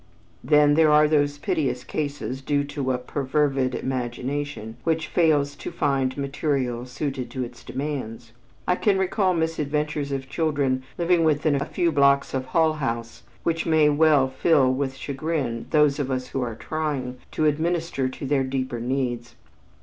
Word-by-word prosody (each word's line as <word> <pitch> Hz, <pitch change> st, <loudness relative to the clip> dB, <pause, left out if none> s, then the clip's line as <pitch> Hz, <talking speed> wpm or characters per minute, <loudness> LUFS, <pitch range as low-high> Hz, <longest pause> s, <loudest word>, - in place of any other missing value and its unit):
Then 150 Hz, +2 st, +5 dB
there 160 Hz, 0 st, +5 dB
are 150 Hz, 0 st, +6 dB
those 145 Hz, -1 st, +2 dB
piteous 130 Hz, -4 st, -1 dB
cases 140 Hz, -4 st, -4 dB
due 145 Hz, +1 st, 0 dB
to 140 Hz, -2 st, -2 dB
a 125 Hz, -, 0 dB
perfervid 135 Hz, 0 st, 0 dB
imagination 130 Hz, -1 st, -4 dB
which 160 Hz, -1 st, 0 dB
fails 145 Hz, -4 st, +2 dB
to -, -, -6 dB
find 135 Hz, -5 st, 0 dB
material 135 Hz, -3 st, -1 dB
suited 130 Hz, -1 st, -4 dB
to 130 Hz, +1 st, -3 dB
its 120 Hz, -1 st, -9 dB
demands. 130 Hz, -5 st, -5 dB, 0.4 s
I 180 Hz, -, +2 dB
can 200 Hz, -3 st, +2 dB
recall 190 Hz, 0 st, +1 dB
misadventures 150 Hz, -2 st, -1 dB
of 135 Hz, -1 st, -3 dB
children 140 Hz, -5 st, 0 dB, 0.2 s
living 170 Hz, -1 st, +3 dB
within 155 Hz, -1 st, +2 dB
a 140 Hz, 0 st, 0 dB
few 170 Hz, -1 st, 0 dB
blocks 140 Hz, -1 st, +3 dB
of 130 Hz, -1 st, -1 dB
Hull 160 Hz, +1 st, +3 dB
House 115 Hz, -6 st, -4 dB, 0.2 s
which 165 Hz, 0 st, -1 dB
may 155 Hz, -2 st, +4 dB
well 150 Hz, -2 st, +4 dB
fill 130 Hz, -1 st, +3 dB
with 135 Hz, 0 st, -2 dB
chagrin 135 Hz, -5 st, -3 dB
those 150 Hz, -2 st, +3 dB
of 140 Hz, -2 st, -1 dB
us 130 Hz, -1 st, -2 dB
who 135 Hz, -, -2 dB
are 120 Hz, -3 st, -3 dB
trying 135 Hz, -3 st, -3 dB
to 155 Hz, -, +1 dB
administer 160 Hz, -2 st, 0 dB
to 130 Hz, -, -7 dB
their 135 Hz, 0 st, +2 dB
deeper 130 Hz, -2 st, -3 dB
needs. 120 Hz, -1 st, -2 dB
140 Hz, 155 wpm, -24 LUFS, 130-155 Hz, 0.4 s, are